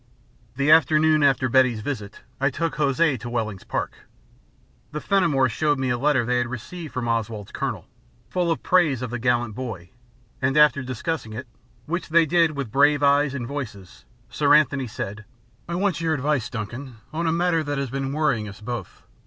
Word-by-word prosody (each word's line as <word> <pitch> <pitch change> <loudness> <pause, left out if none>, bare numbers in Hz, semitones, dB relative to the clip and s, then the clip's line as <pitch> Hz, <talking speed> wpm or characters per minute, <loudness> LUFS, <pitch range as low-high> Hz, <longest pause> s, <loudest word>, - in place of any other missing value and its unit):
The 140 +3 +2
afternoon 155 0 +5
after 135 -2 +3
Betty's 130 -3 +3
visit, 105 -5 -5 0.2
I 135 +1 +2
took 165 +5 -3
Hosea 145 -1 +2
to 120 - -6
Wellings 110 -5 -3
Park. - - -5 0.8
The 150 - -4
Fenimores 150 -10 +2
shewed 145 +5 +1
me 130 -1 -1
a 120 - 0
letter 140 -3 +2
they 125 +1 +1
had 120 - 0
received 150 +7 -7
from 125 -2 -3
Oswald's 115 -3 -2
Colonel, - - -4 0.4
full 180 -2 -1
of 165 - -1
praise 155 -9 +3
of 125 - -4
the 125 - -3
gallant 120 -2 +1
boy, 110 -8 -6 0.5
and 135 +3 +1
after 150 -3 +5
discussing 130 -1 -4
it, 120 +4 -6 0.4
which 170 +2 -3
they 165 +1 +5
did 165 -1 +2
with 135 -6 -4
brave 145 +2 +4
eyes 140 0 +3
and 125 -4 -3
voices, 115 -9 -7 0.2
Sir 145 -1 +3
Anthony 140 -3 +2
said: 105 -1 -6 0.5
"I 170 - -2
want 185 -3 0
your 160 -1 +1
advice, 145 -3 0
Duncan, 120 +3 -6 0.2
on 165 +1 -1
a - - +2
matter 170 -1 +1
that 145 -1 -3
has 135 -3 -3
been 135 0 -2
worrying 140 -8 0
us 100 - -11
both. 115 -2 -6
135 Hz, 185 wpm, -24 LUFS, 120-155 Hz, 0.8 s, afternoon